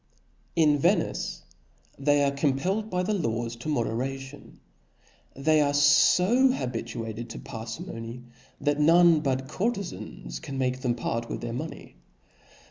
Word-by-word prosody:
In 150 -3 +4
Venice, - - 0 0.6
they 145 +1 +3
are 140 - +2
compelled 150 +10 0
by 180 -2 0
the 210 +4 0
laws 115 - -2
to 120 +6 -6
moderation. 135 +2 -3 0.8
They 155 +3 +3
are 145 -1 +1
fo 180 - +5
habituated 115 - -4
to - - -7
parfimony^ 115 +1 -7 0.4
that 145 0 0
none 165 +1 +6
but 135 -2 -1
courtezans 130 - -4
can 135 - -6
make 130 -1 0
them 125 -3 0
part 115 0 -3
with - - -4
their 120 -1 -4
money. 155 +7 -7
135 Hz, 130 wpm, -27 LUFS, 115-155 Hz, 0.8 s, none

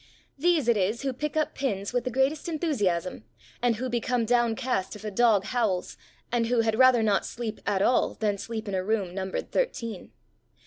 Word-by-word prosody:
These 320 -3 +2
it 235 -2 +4
is 205 +6 0
who 270 -1 -1
pick 300 +4 -3
up 310 - 0
pins 205 -6 -2
with 245 -1 0
the - - 0
greatest 265 +6 0
enthusiasm, 205 - -1 0.4
and 240 -1 +2
who 255 +4 -3
become 240 0 0
downcast 240 -3 0
if 210 - -11
a 210 - -3
dog 215 -2 +4
howls, 220 -7 -1 0.4
and 235 -1 +1
who 240 -1 +3
had 220 0 0
rather 255 -3 +6
not 205 -3 +2
sleep 230 -2 -5
at 195 -1 +2
all 250 - +2
than 205 -2 -1
sleep 220 0 -5
in 200 - -4
a 185 -1 0
room 200 -3 -1
numbered 190 0 -4
thirteen. 230 - -2
230 Hz, 190 wpm, -27 LUFS, 205-255 Hz, 0.4 s, rather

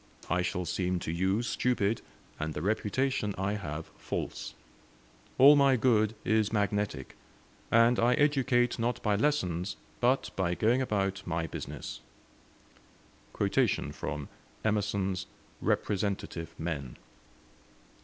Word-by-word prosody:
I 90 - +3
shall 90 0 -2
seem 90 +2 -1
to - - -3
you 95 +6 +1
stupid, 115 -3 0 0.4
and 80 0 -3
the 75 - -3
reputation 105 +1 0
I 95 +2 0
have 80 -6 -4
false. - - -4 0.8
All 140 +3 +9
my 140 -2 +5
good 110 -3 +3
is 110 -1 +2
magnetic, 105 - -1 0.5
and 115 +1 +5
I 120 +2 +4
educate 130 -5 +2
not 120 +2 0
by 105 -2 +2
lessons, 95 - 0 0.2
but 125 +2 +2
by 90 -2 0
going 120 +7 +2
about 100 -5 0
my 85 -1 -1
business." 80 - -6 2.7
Emerson's 100 -3 0 0.3
'Representative 95 -5 -1
Men'. 75 -7 -4
105 Hz, 105 wpm, -30 LUFS, 90-120 Hz, 2.7 s, All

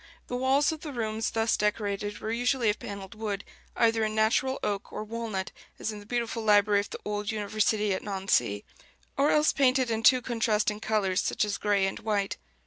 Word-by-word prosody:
The 245 - -4
walls 265 +4 +3
of 315 -1 -6
the 305 - -6
rooms 220 -2 -2
thus 225 0 +1
decorated 205 -1 -1
were 220 - -4
usually 245 -1 +2
of 210 - -7
panelled 200 -1 -7
wood, 210 -2 -4 0.3
either 225 -1 +3
in 215 0 -1
natural 230 +5 +2
oak 200 -1 -2
or - - -4
walnut, 215 -3 -4 0.3
as 220 - -3
in 210 - -7
the 205 - -14
beautiful 235 -1 -2
library 205 -1 +4
of 200 - -4
the - - -6
old 210 0 -2
university 210 -1 0
at 185 - -2
Nancy, 190 - 0 0.5
or 280 +2 +3
else 300 0 +4
painted 260 -2 +3
in 225 0 0
two 250 +3 +5
contrasting 215 -3 0
colors, 205 -4 +1
such - - 0
as 205 - -3
gray 205 -2 +2
and 195 - -3
white. 210 -3 -1
215 Hz, 195 wpm, -28 LUFS, 205-230 Hz, 0.5 s, two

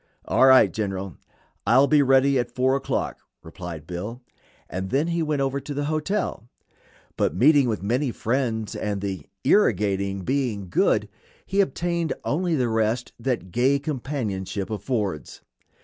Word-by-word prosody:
"All 130 - +4
right, 130 -1 +6
General; 95 -3 -3 0.5
I'll 130 +4 +6
be 150 0 +4
ready 135 0 +4
at 120 0 -1
4 130 +1 +2
o'clock," 135 - -2 0.2
replied 80 -2 -8
Bill, 105 +9 -6 0.4
and 95 +1 -4
then 145 - +1
he 170 0 0
went 150 -3 0
over 135 +1 -1
to 145 +1 -7
the 145 0 -1
hotel; 155 - -2 0.7
but - - +1
meeting 140 -1 +5
with 105 -4 -2
many 125 +7 0
friends, 115 -2 -2
and 105 -1 -2
the 95 -2 -4 0.2
"irrigating" 100 - +2
being 115 -5 -2
good, - - +2 0.4
he 200 +1 +2
obtained 170 0 -1
only 170 +3 0
the 125 -4 +1
rest 115 +2 0
that 115 -7 -2
gay 130 +6 +3
companionship 120 - -3
affords. 105 - -3
125 Hz, 145 wpm, -24 LUFS, 100-140 Hz, 0.7 s, right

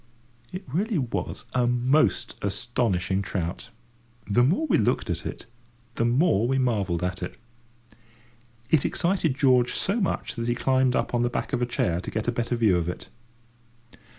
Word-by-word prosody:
It 185 - -6
really 195 - -1
was 125 -5 -3
a 125 -1 +2
most 125 +5 +2
astonishing 100 -3 -1
trout. 90 +1 -4 0.6
The 105 +3 +3
more 165 - +2
we 295 - +2
looked 105 - +1
at - - -3
it, - - -7 0.5
the 115 - 0
more 120 - +3
we 135 +1 +1
marvelled 100 -9 0
at 90 0 -2
it. 90 - -5 1.4
It 155 -4 +4
excited 170 -5 0
George 130 -3 +3
so 200 +5 0
much 190 - -1
that 115 0 -2
he 120 - +1
climbed 130 0 +2
up - - -1
on 120 - +2
the 120 - +2
back 125 - -4
of 125 - 0
a 120 - +1
chair 90 -7 0
to - - -6
get 110 +1 -3
a - - +3
better 120 +1 -1
view 110 -6 +3
of 85 0 -2
it. 90 - -7
120 Hz, 175 wpm, -26 LUFS, 100-135 Hz, 1.4 s, It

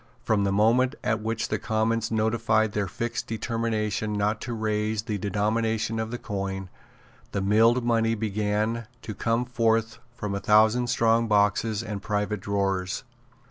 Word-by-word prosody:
From 105 -4 +2
the 100 - +1
moment 115 +6 +3
at 110 0 0
which 115 +1 -2
the - - -1
Commons 110 0 0
notified 110 0 +1
their 105 -1 -1
fixed 115 +6 -4
determination 110 -2 -2
not 105 +1 0
to 125 - -5
raise 110 -1 -1
the 105 -3 -3
denomination 110 +2 0
of 110 0 -2
the 120 - -4
coin, 95 -3 -4 0.6
the - - 0
milled 115 +5 +4
money 115 -1 +2
began 105 +1 -1 0.2
to 110 - -5
come 115 +5 0
forth 115 -2 0 0.2
from 105 -5 -4
a 100 - -1
thousand 110 +4 +4
strong 115 -1 +2
boxes 105 +1 +2
and 105 -4 -5
private 105 0 -1
drawers. 95 -1 -1
110 Hz, 150 wpm, -26 LUFS, 105-115 Hz, 0.6 s, milled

